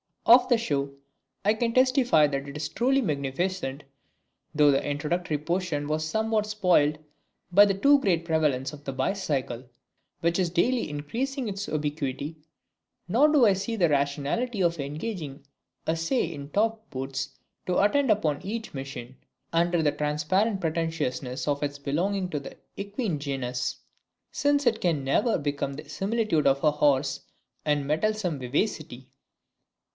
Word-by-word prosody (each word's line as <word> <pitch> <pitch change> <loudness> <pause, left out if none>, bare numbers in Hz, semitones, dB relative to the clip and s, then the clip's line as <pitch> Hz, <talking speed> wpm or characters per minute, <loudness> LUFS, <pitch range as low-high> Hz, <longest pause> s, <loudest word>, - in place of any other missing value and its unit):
Of 245 +2 +7
the 240 - +5
show, 140 -11 -2 0.5
I 210 - +5
can 230 +1 -1
testify 255 - +4
that 140 -1 -2
it 140 - -7
was 150 0 -4
truly 265 +3 +2
magnificent, 145 - -2 0.7
though 150 -1 +6
the 135 - +1
introductory 150 +2 -1
portion 165 -2 -2
was 155 +1 -1
somewhat 220 +3 0
spoilt 180 -8 +3 0.6
by 200 +3 +8
the 200 - +2
too 280 +8 +5
great 175 -9 +1
prevalence 150 -5 0
of 145 -1 -11
the 135 - -4
bicycle, 135 - -2 0.6
which 170 +2 +1
is 180 -2 +1
daily 230 +8 +1
increasing 240 - -3
its 200 0 -4
ubiquity, 150 0 -3 0.7
nor 245 +11 +4
do 295 -5 +5
I 205 - +5
see 200 +4 -3
the 175 -6 +3
rationality 145 - 0
of 170 -2 +1
engaging 150 0 -5 0.4
a 160 - +1
sais 165 +2 0
in 140 -1 -8
topped 220 +5 0
boots 135 0 -5 0.3
to 180 - +2
attend 265 +7 +3
upon 160 -9 +1
each 225 +4 -5
machine, 135 -2 -7 0.4
under 170 0 +2
the 145 - +3
transparent 155 +8 0
pretentiousness 155 -6 -2
of 145 -1 0
its 145 -1 -2
belonging 180 +7 -1
to 150 - -2
the 140 - -10 0.2
equine 200 - -3
genus, 130 -3 -3 0.5
since 285 0 +1
it 225 -2 +2
can 160 -6 +1
never 210 - +2
become 145 -2 -2
the 150 +3 -10
similitude 205 -7 0
of 135 0 +2
a 150 - +5
horse 140 -2 +1 0.4
in 145 -2 +1
mettlesome 180 +1 0
vivacity. 130 - -2
160 Hz, 150 wpm, -27 LUFS, 145-210 Hz, 0.7 s, by